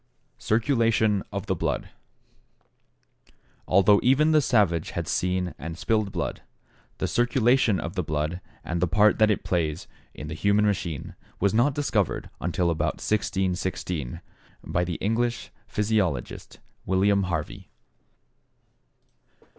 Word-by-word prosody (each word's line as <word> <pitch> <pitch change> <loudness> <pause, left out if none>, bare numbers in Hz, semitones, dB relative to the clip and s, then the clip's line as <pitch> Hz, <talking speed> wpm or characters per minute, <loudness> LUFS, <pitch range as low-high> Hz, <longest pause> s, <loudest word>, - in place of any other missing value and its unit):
=Circulation 115 -3 +2
of 100 0 -4
the 95 - 0
Blood.= 85 - -2 1.8
Although 100 +2 +5
even 140 +5 +4
the 155 -1 +5
savage 100 - +2
had - - -2
seen 90 0 -1
and 80 +4 -6
spilled 110 -1 0
blood, - - -3 0.6
the - - -1
circulation 120 -3 +2
of 85 - -5
the 95 - -1
blood, 75 +3 -2 0.2
and 85 +1 -3
the 90 - +3
part 105 +6 +3
that 110 0 +5
it 105 - 0
plays 80 -3 -1 0.3
in 75 - -7
the 80 - -5
human 100 +6 +2
machine, 85 -7 -2 0.3
was 100 +1 +2
not 125 +5 +3
discovered 110 - -1
until 85 +1 0
about 80 - 0
1616, 90 - -2 0.4
by 90 - 0
the 90 -1 -3
English 115 +5 -1 0.2
physiologist, 100 - -1 0.3
William 100 +2 +3
Harvey. 80 -4 -4
100 Hz, 125 wpm, -25 LUFS, 85-110 Hz, 1.8 s, Although